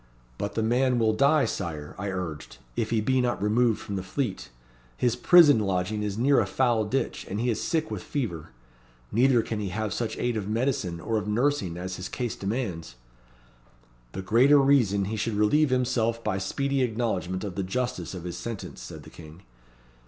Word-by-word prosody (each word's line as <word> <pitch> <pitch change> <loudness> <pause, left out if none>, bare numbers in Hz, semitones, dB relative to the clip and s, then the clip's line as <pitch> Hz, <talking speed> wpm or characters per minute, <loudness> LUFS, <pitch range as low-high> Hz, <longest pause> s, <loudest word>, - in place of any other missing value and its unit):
'But 100 0 -3
the 110 - 0
man 125 +2 +2
will 110 -2 +2
die, 140 +5 +4
Sire,' 75 -3 -4
I 100 +1 -4
urged, 90 -5 -5 0.2
'if 110 - -1
he 115 -2 +1
be 130 +3 +2
not 120 -1 0
removed 110 +2 +2
from 100 - -5
the - - -2
Fleet. 100 +3 -3 0.5
His 120 -2 +1
prison 145 -1 +7
lodging 100 +1 -1
is 105 -1 -3
near 135 +4 +4
a 105 - +1
foul 120 0 +1
ditch, 130 +6 -2
and 100 - -3
he 120 +1 +1
is 110 - -2
sick 160 -2 -1
with - - -4
fever. 85 - -4 0.6
Neither 125 0 +4
can 110 - -4
he 100 -2 -3
have 105 +2 -3
such 110 -2 -3
aid 120 -2 -1
of 105 -1 -4
medicine 110 -7 -1
or 110 +5 -1
of 105 - -6
nursing 105 -6 0
as 95 +1 -5
his 90 +1 -6
case 120 -3 -3
demands.' 95 - -4 1.2
'The 95 - -5
greater 125 +9 +5
reason 125 -8 +3
he 110 +3 -3
should 110 +1 -1
relieve 135 +9 +3
himself 120 -2 0
by 95 - -1
speedy 140 +8 -1
acknowledgment 110 -6 -1
of 100 -3 -4
the 100 - -2
justice 95 -2 -3
of 90 - -7
his 85 -1 -5
sentence,' 115 - -6
said - - -9
the - - -13
King. 80 +1 -13
110 Hz, 190 wpm, -26 LUFS, 95-125 Hz, 1.2 s, prison